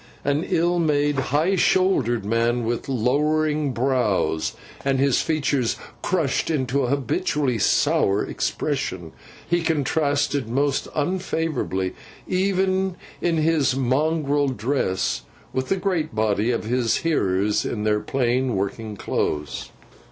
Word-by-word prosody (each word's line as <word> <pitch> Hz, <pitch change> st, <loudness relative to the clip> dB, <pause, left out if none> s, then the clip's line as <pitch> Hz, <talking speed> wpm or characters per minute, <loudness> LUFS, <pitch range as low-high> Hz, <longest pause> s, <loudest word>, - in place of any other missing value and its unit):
An 145 Hz, +3 st, +1 dB
ill 175 Hz, +1 st, +1 dB
made, 145 Hz, -3 st, +2 dB
high 160 Hz, +8 st, +2 dB
shouldered 145 Hz, -, +2 dB
man, 115 Hz, +2 st, +1 dB
with 120 Hz, +3 st, -2 dB
lowering 150 Hz, +4 st, +1 dB
brows, 120 Hz, -10 st, 0 dB, 0.3 s
and 135 Hz, -1 st, +1 dB
his 135 Hz, -1 st, +3 dB
features 140 Hz, -6 st, 0 dB, 0.2 s
crushed 165 Hz, -7 st, 0 dB
into 135 Hz, -3 st, 0 dB
an -, -, -2 dB
habitually 140 Hz, -2 st, 0 dB
sour 100 Hz, 0 st, +2 dB
expression, -, -, -2 dB, 0.4 s
he 175 Hz, 0 st, +1 dB
contrasted 145 Hz, -4 st, 0 dB
most 140 Hz, +3 st, 0 dB
unfavourably, 155 Hz, -, -1 dB, 0.3 s
even 190 Hz, 0 st, +1 dB, 0.3 s
in 170 Hz, -2 st, +1 dB
his 155 Hz, -4 st, +2 dB
mongrel 145 Hz, +2 st, +1 dB
dress, 110 Hz, -, -1 dB, 0.3 s
with 130 Hz, 0 st, -1 dB
the 195 Hz, -, +2 dB
great 180 Hz, -, -1 dB
body 110 Hz, 0 st, +1 dB
of 120 Hz, -, 0 dB
his 120 Hz, 0 st, +1 dB
hearers 105 Hz, -, +1 dB
in 105 Hz, -3 st, -3 dB
their 105 Hz, 0 st, +2 dB
plain 125 Hz, +2 st, 0 dB
working 105 Hz, +2 st, -3 dB
clothes. 75 Hz, -5 st, -2 dB
140 Hz, 115 wpm, -23 LUFS, 115-155 Hz, 0.4 s, his